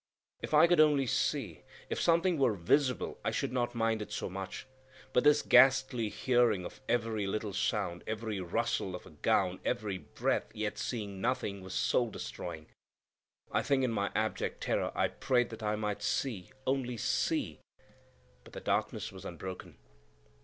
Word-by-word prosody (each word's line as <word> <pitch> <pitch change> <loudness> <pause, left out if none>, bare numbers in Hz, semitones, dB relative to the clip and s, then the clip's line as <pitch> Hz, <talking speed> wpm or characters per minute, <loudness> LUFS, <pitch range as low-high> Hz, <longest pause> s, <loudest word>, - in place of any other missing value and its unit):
If - - -1
I - - +8
could 175 -1 +3
only 150 -3 +5
see! 120 - -1 0.3
If - - -2
something 170 0 +3
were 120 -6 +3
visible, 125 - +1
I - - +1
should - - -1
not 120 -1 -1
mind 115 -1 +1
it 105 - -7
so 105 - -3
much; 95 0 -6 0.5
but 125 - +4
this 150 0 +5
ghastly 130 -2 +5
hearing 120 -7 +2
of - - -9
every 115 -4 0
little 105 0 -2
sound, 85 -1 -1
every 110 -2 -3
rustle 95 0 -1
of 90 - -9
a - - -13
gown, 75 - +1
every 100 -3 -2
breath, 75 - -1
yet 105 -1 -3
seeing 100 -5 -4
nothing, 105 -5 -1
was 95 0 -7
soul 120 -2 +2
destroying. 80 - -6 0.9
I - - +2
think 140 -2 +1
in 125 - +1
my 100 -2 0
abject 110 0 -1
terror - - 0
I - - +2
prayed 120 -2 0
that 115 0 -8
I 105 0 0
might 105 -1 -3
see, 105 -2 -2 0.2
only 130 -2 0
see; 110 - 0 0.8
but - - -16
the - - -6
darkness - - -1
was - - -11
unbroken. 95 -1 -7
110 Hz, 165 wpm, -32 LUFS, 100-130 Hz, 0.9 s, I